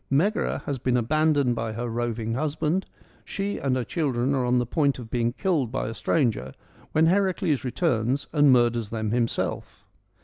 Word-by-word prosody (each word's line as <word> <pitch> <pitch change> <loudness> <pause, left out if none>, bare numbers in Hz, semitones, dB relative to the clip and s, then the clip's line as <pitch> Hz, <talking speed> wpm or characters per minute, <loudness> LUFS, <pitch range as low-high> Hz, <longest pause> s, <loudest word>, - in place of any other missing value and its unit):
Megara 190 +11 +1
has 140 -3 -3
been 125 +1 +1
abandoned 145 +1 +2
by 115 -2 -3
her 120 +2 -3
roving 115 -1 -2
husband: 155 +6 -1 0.4
she 200 +1 -3
and 135 -2 0
her 130 - -1
children 135 -4 -1
are 130 -2 +1
on 125 +1 +2
the 125 - +1
point 140 +3 +1
of 120 -3 -10
being 120 -1 +1
killed 145 - 0
by 130 - -2
a 110 - -4
stranger 115 - 0 0.4
when 160 +1 +3
Heracles 185 -5 +1
returns 130 -1 0
and 145 -3 +5
murders 120 -3 +2
them 110 -2 -2
himself. 120 0 -2
130 Hz, 170 wpm, -25 LUFS, 120-155 Hz, 0.4 s, and